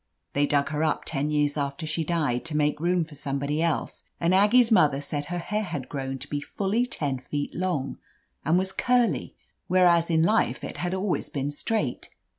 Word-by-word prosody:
(They 145 +1 +2
dug 140 -1 +1
her 150 +1 -1
up 155 - 0
ten 145 -1 -1
years 150 -1 +1
after 140 +2 -2
she 155 +1 -1
died, 150 -7 0
to 155 -2 -1
make 150 0 +1
room 175 +1 +2
for 155 -1 -11
somebody 140 +1 -2
else, 165 -2 -1 0.2
and 170 +2 +2
Aggie's 225 +5 +5
mother 150 -9 +5
said 145 0 -3
her 175 +4 -4
hair 210 +5 -2
had 145 -10 -5
grown 135 -1 -3
to - - -10
be 145 -1 -3
fully 210 +10 -1
ten 140 - -2
feet 145 +3 -4
long, 170 -7 -2 0.4
and 160 +3 +3
was 190 +1 0
curly, 235 - +1 0.3
whereas 175 -2 +4
in 160 -1 +3
life 210 +6 +2
it - - -6
had 180 +1 -2
always 190 0 -1
been 140 0 -2
straight. 145 - -2
155 Hz, 195 wpm, -26 LUFS, 145-180 Hz, 0.4 s, Aggie's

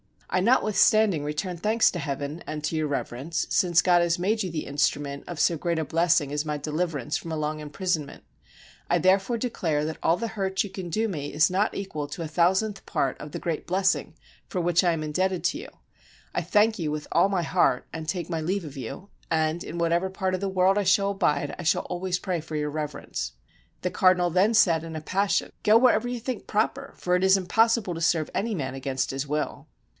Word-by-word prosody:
I 185 - +3
notwithstanding 215 - +3
return 150 +5 -3
thanks 215 +6 +3
to 175 - -4
Heaven 145 +2 -4
and 150 -1 -5
to 160 - -1
Your 155 -1 0
Reverence, 140 +2 -3
since 175 -2 +3
God 175 -1 +5
has 170 -1 +1
made 210 +5 0
you 190 - -2
the 160 -2 -4
instrument 140 0 -1
of 175 -3 -3
so 170 - +3
great 170 +1 -1
a 160 - 0
blessing 165 -2 +2
as 150 +1 -1
my 150 -1 -2
deliverance 150 -1 -2
from 165 - -6
a - - -2
long 155 0 -2
imprisonment 155 0 -3 0.7
I - - +4
therefore 195 +5 +2
de 245 +2 -2
clare 155 -9 -1
that 160 0 -4
all 165 - +3
the 230 +2 -3
hurt 195 -3 -1
you 205 - -6
can 185 -2 -6
do 220 +6 0
me 145 -6 -5
is 155 +4 +3
not 200 +4 +1
equal 155 -7 -4
to 150 +4 -7
a - - -4
thousandth 190 +5 +1
part 135 -2 -1
of 150 - -8
the - - -5
great 165 -3 -3
blessing 190 +2 +1 0.3
for 185 - -2
which 175 +1 +3
I 175 -2 +3
am 155 -1 -3
indebted 185 +4 -1
to - - 0
you. - - -8 0.7
I - - 0
thank 215 0 +2
you 155 -3 -1
with 150 0 -4
all 175 +4 +4
my 190 -3 0
heart, 125 -5 +2
and 160 0 -6
take 175 -1 -3
my 165 -2 -1
leave 180 +3 -2
of 145 -2 -9
you, 135 - -7 0.2
and 160 +1 0
in 170 - -7
whatever 170 +2 +1
part 190 0 -2
of 185 - 0
the 200 - -1
world 190 +1 +3
I 205 - +2
shall 200 +1 +3
abide 150 -7 0
I - - -4
shall 160 - +2
always 180 0 -2
pray 180 -1 -2
for 160 0 -7
Your 150 -1 -1
Reverence." 145 - -4 0.5
The 180 - -1
cardinal 185 -1 +3
then 185 +6 +3
said 165 -6 +4
in 165 -1 -7
a 155 - -4
passion, 195 +5 0
"Go 215 +2 +6
wherever 245 0 +4
you 245 -1 -4
think 250 -1 -5
proper, 260 +6 -1
for 180 0 +1
it 180 - +1
is 190 0 +6
impossible 220 +1 +2
to 165 - -6
serve 160 -1 +1
any 220 +1 -1
man 135 -6 -3
against 135 -1 -2
his 135 +2 -3
will." 150 +1 -3
175 Hz, 225 wpm, -26 LUFS, 155-195 Hz, 0.7 s, Go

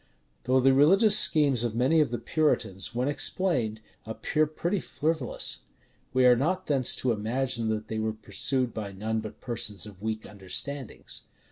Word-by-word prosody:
Though 130 +1 +3
the 135 +1 +4
religious 195 - +5
schemes 140 -6 +5
of 115 -2 -3
many 135 +7 +2
of 150 - 0
the 120 - -3
Puritans, 120 - -1
when 125 +2 -1
explained, 135 - 0 0.2
appear 150 +7 -1
pretty 175 +5 -3
frivolous, 155 -5 -2 0.5
we 130 0 +2
are 125 -1 +6
not 180 +9 -1
thence 135 -4 +4
to 125 - -1
imagine 115 +2 -1
that 110 -1 -3
they 110 - -4
were 110 0 -1
pursued 125 +3 -2
by 105 -3 -6
none 110 +3 -3
but 110 -1 -9
persons 115 -4 -3
of 100 -3 -13
weak 110 0 -4
understandings. 110 +7 -5
125 Hz, 160 wpm, -27 LUFS, 110-145 Hz, 0.5 s, are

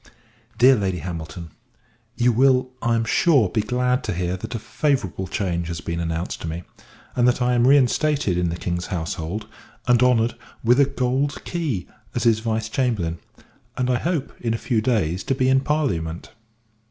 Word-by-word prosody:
DEAR 130 +2 +7
LADY 95 -5 -1
HAMILTON, 85 0 -6 0.6
You 120 0 +3
will, 130 +1 +3
I 120 -1 +2
am 115 0 0
sure, 130 - +3
be 110 +3 0
glad 125 +4 0
to 105 - -1
hear, 90 +1 -1
that 105 +6 -6
a - - 0
favourable 110 - -1
change 85 -3 -2
has 85 -1 -4
been 85 0 -4
announced 85 +1 -3
to - - -4
me; 80 +2 -5 0.5
and 125 -1 +3
that 125 - +2
I 125 0 +2
am 120 0 +3
reinstated 140 - +3
in 90 -1 +1
the 85 - -3
King's 85 0 -3
household, 85 +3 -4 0.4
and 125 -1 +4
honoured 120 -2 +3 0.3
with 120 +3 +4
a 140 - +7
gold 135 +1 -1
key, 150 - -2 0.3
as - - 0
his 115 -2 +4
Vice 110 -1 -2
Chamberlain 110 -9 -1 0.6
and 125 -1 +1
I 125 - +1
hope, 165 -5 -2
in 115 -1 0
a - - -8
few 115 -5 +2
days, 95 -8 0
to 135 - 0
be 130 -1 +1
in 135 0 +5
parliament. 95 - -2
115 Hz, 180 wpm, -23 LUFS, 90-130 Hz, 0.6 s, DEAR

